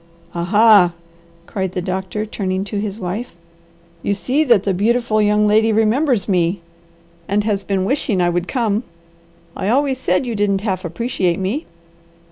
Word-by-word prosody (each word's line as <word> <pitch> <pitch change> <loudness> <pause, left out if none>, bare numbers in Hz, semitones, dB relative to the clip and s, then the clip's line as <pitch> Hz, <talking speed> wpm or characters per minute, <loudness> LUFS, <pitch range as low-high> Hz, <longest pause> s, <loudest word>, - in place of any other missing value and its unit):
"A 170 0 -2
ha!" 205 -2 +5 0.5
cried 190 -3 -3
the - - -2
doctor, 190 +3 -3
turning 190 -3 -2
to 205 0 -4
his 205 0 -4
wife. 195 +3 -5 0.7
"You 200 - 0
see 255 - 0
that 235 -7 +4
the 200 - 0
beautiful 220 +2 +1
young 210 0 +3
lady 220 +2 +3
remembers 225 - +2
me, 180 -1 +1 0.7
and 205 +1 +1
has 205 -2 0
been 195 -1 -1
wishing 240 -5 0
I 175 -1 +3
would 175 +1 -2
come. 225 -5 0 0.7
I 190 - -2
always 265 +1 +1
said 185 -2 0
you 240 - -3
didn't 200 -2 0
half 190 -3 -2
appreciate 180 -1 -1
me. 200 - -3
205 Hz, 160 wpm, -19 LUFS, 185-225 Hz, 0.7 s, ha